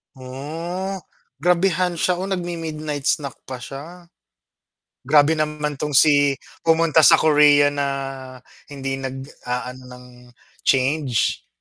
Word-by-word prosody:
Oh, 165 +9 -6 0.5
grabehan 180 -1 +1
siya, 180 - +2
oh, 185 - -5
nag-mi-midnight 165 -6 -4
snack 140 -1 0
pa 130 -1 -8
siya. 165 +8 -10 1.0
Grabe 145 +1 +5
naman 150 -2 -2
tong 150 -2 -2
si 145 -1 +5 0.3
pumunta 160 -1 +4
sa 155 - +8
Korea 145 -2 +5
na 140 -1 -1 0.8
hindi 135 -1 -5
nag-aano 130 -1 -6
ng 125 0 -12 0.6
change. 135 -2 +1
150 Hz, 105 wpm, -21 LUFS, 135-165 Hz, 1.0 s, sa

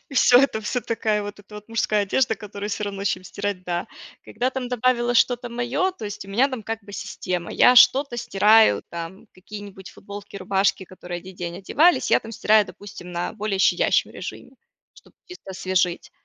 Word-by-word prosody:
и 275 - -11
всё 250 -1 +6
это, 270 -5 +1
всё 245 +4 -2
такая 220 -3 -1
вот 205 0 -7
эта 205 +1 -15
вот 210 +1 -11
мужская 215 -2 +1
одежда, 220 +3 +1
которую 205 0 -7
всё 210 - -3
равно, 200 -1 -5
чем 185 -2 -1
стирать, 200 -1 -4
да. 175 -1 -3 0.4
Когда 245 +4 -2
там 260 -1 -4
добавила 245 0 +1
что-то 245 +1 +2
мое, 245 +11 -1
то 360 - -10
есть 205 -1 -6
у - - -14
меня 245 +8 +2
там 255 -5 -6
как 225 0 -5
бы 205 0 -13
система, 180 -3 -4
я 250 - +5
что-то 265 0 +6
стираю, 220 -1 +4
там 170 +3 -8
какие-нибудь 195 0 -10
футболки, 205 0 -10
рубашки, 195 0 0
которые 180 -1 -8
1 185 +1 -12
день 175 -1 -5
одевались, 320 - +2
я - - +5
там 225 - -10
стираю, 215 -1 +3
допустим, 180 -1 -11
на 175 0 -3
более 210 -2 -3
щадящем - - +2
режиме, - - -8 0.4
чтоб - - -20 0.2
их 360 - -10
освежить. 185 -2 -1
210 Hz, 190 wpm, -23 LUFS, 190-240 Hz, 0.4 s, всё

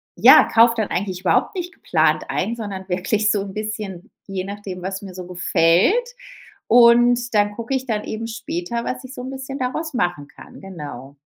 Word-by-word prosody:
ja, - - +8
kaufe 230 +1 +5
dann 215 - -1
eigentlich 185 -1 -3
überhaupt 385 - +1
nicht 360 +1 -5
geplant - - +1
ein, 235 - -1
sondern 195 -4 -6
wirklich 205 +4 0
so 205 - 0
'n 195 -1 -7
bisschen, 215 -1 -6 0.2
je 190 -1 -4
nachdem, 200 -2 -7
was 190 +2 -4
mir 190 -2 -9
so 180 -1 -8
gefällt. 180 - +2 0.6
Und 240 0 +5
dann 205 0 +3
gucke 230 +4 -4
ich 260 - -3
dann 215 -3 -2
eben 225 +1 -5
später, 220 0 -4
was 255 - -4
ich 260 - -9
so - - -8
'n 260 - -6
bisschen 270 +1 -6
daraus 280 +5 -3
machen 175 - -1
kann. - - -14
Genau. 145 -7 -9
210 Hz, 185 wpm, -21 LUFS, 185-240 Hz, 0.6 s, ja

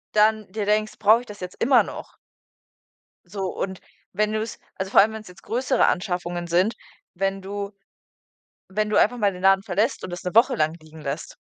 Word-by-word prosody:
Dann 215 -1 +3
dir 210 +1 -3
denkst: 215 +1 0
„Brauche 220 +2 +5
ich - - -13
das 210 -3 -11
jetzt 180 0 -8
immer 250 +1 +5
noch?“ - - -9 1.1
So 190 +1 -4
und 190 -1 -4 0.3
wenn 215 0 +1
du's 220 +1 -3 0.2
also 190 0 -4
vor - - +6
allem, 215 +2 +2
wenn's 220 0 -8
jetzt 180 0 -15
größere 255 +2 +1
Anschaffungen 175 -2 -2
sind 180 +6 +2 0.4
wenn 195 +1 -1
du 200 +1 -5 1.0
wenn 215 +2 -1
du - - +1
einfach 245 +3 +3
mal 205 -3 +2
den 180 0 -10
Laden 195 0 +5
verlässt 210 +6 0
und - - -5
das 175 0 -6
'ne 180 - -3
Woche 240 +4 +5
lang 155 +1 +1
liegen 155 0 -14
lässt. 145 +3 -5
200 Hz, 195 wpm, -24 LUFS, 180-215 Hz, 1.1 s, vor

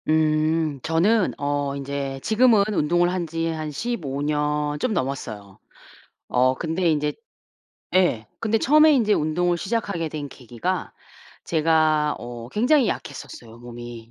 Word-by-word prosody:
음. 155 -1 +2
저는 185 - +1
어 145 -1 -1
인제 140 -1 -4
지금은 220 -2 +4
운동을 175 +1 +2
한 175 -2 -2
지 165 +1 -2
한 155 -1 -4
15 150 - -3
년 150 0 -1
좀 230 - 0
넘었어요. 110 - -4 0.7
어 130 +1 +2
근데 165 +5 -1
인제 150 -1 0 0.8
예. 175 - +2
근데 225 0 +1
처음에 305 +6 +5
인제 225 -7 +3
운동을 175 +3 +1
시작하게 195 -4 -2
된 145 -2 -5
계기가 120 -4 -4 0.5
제가 155 -2 +2
어 120 -1 -8
굉장히 250 - +3
약했었어요, 115 -1 -7
몸이. 120 -1 -10
155 Hz, 245 characters per minute, -23 LUFS, 140-180 Hz, 0.8 s, 처음에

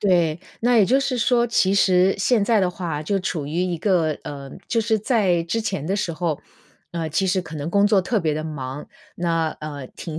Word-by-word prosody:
对。 175 -5 +2 0.2
那 245 +1 +3
也 210 - +6
就 265 +2 +3
是 265 -2 -1
说， 240 +1 +3
其 195 -4 +2
实 185 -1 +4
现 215 +1 +2
在 220 0 +3
的 185 -2 +1
话， 165 -5 -4
就 195 +5 0
处 165 -5 -3
于 - - -6
一 180 -2 -1
个 165 -5 +1
呃， 140 -2 -7 0.2
就 230 - +1
是 220 -1 +1
在 200 -6 +2
之 225 +7 -1
前 200 -9 -3
的 195 - 0
时 175 -4 -2
候， 160 -2 -2 0.5
呃， 165 -2 -2
其 190 +6 +1
实 185 0 +1
可 160 -1 -8
能 145 +2 -4
工 200 +2 +3
作 205 -2 +4
特 210 +4 0
别 160 -3 0
地 155 +1 -3
忙， 140 -2 -6 0.3
那， 165 -2 0
呃， 145 -3 -6
停 160 -2 -6
180 Hz, 235 characters per minute, -22 LUFS, 155-205 Hz, 0.5 s, 也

